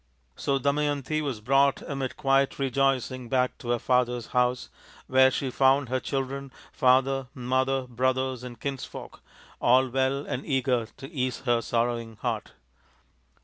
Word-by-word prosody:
So 140 -1 0
Damayanti 145 +2 0
was 135 -8 -3
brought 135 +4 +3
amid 135 -2 -4
quiet 135 -1 +2
rejoicing 130 -2 0
back 125 0 +1
to 120 - -7
her 120 - +2
father's 125 -1 +1
house, 125 0 +1 0.3
where 130 0 +5
she 130 0 -2
found 135 0 +3
her 130 +1 0
children, 135 0 -4 0.2
father, 130 +1 +2
mother, 130 +1 0
brothers, 130 +1 -1
and 120 -3 -9
kinsfolk 135 +1 -6 0.4
all 130 +2 +4
well 135 +2 0
and 130 - -4
eager 130 -5 0
to 135 +3 -9
ease 130 -5 -2
her 120 -2 +1
sorrowing 115 -1 -1
heart. - - -4
130 Hz, 140 wpm, -27 LUFS, 125-135 Hz, 0.4 s, where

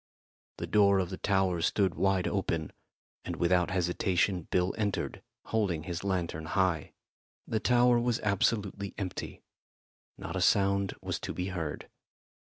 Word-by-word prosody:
The - - -3
door 100 -2 +4
of 95 -1 -1
the 95 - -6
tower 95 -3 +1
stood 95 0 +2
wide 95 0 +1
open, 85 -6 -1 0.5
and - - -4
without 90 +1 +2
hesitation 90 0 0
Bill 90 +1 +1
entered, 105 -3 -2 0.2
holding 95 -8 0
his 85 0 -4
lantern 85 -5 -2
high. 85 -2 0 0.5
The 110 - -1
tower 120 +1 +4
was 120 -1 0
absolutely 100 -1 0
empty. 95 -3 -5 0.7
Not - - -6
a - - -1
sound 100 0 +3
was - - -2
to - - -5
be 90 +1 -2
heard. 85 -6 -4
95 Hz, 140 wpm, -30 LUFS, 90-100 Hz, 0.7 s, door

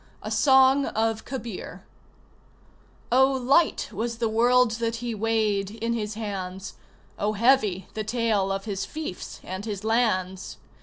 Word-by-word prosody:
A - - -5
SONG 265 0 +5
OF 220 0 -1
KABIR 240 -6 -7 1.3
Oh, 265 +2 +5
light 265 +6 +2
was 230 +2 -3
the 230 -1 0
world 240 +2 +3
that 230 0 0
he 235 0 -4
weighed 215 -2 0
in 230 +2 -3
his 215 -2 -3
hands! 195 -3 -5 0.5
Oh, 210 +1 0
heavy 215 -5 +2
the 215 - -3
tale 215 -3 0
of 195 +1 -3
his 200 -3 -3
fiefs 310 -12 -6
and 190 +2 -6
his 210 -2 -5
lands! 190 -5 0
225 Hz, 140 wpm, -25 LUFS, 200-245 Hz, 1.3 s, SONG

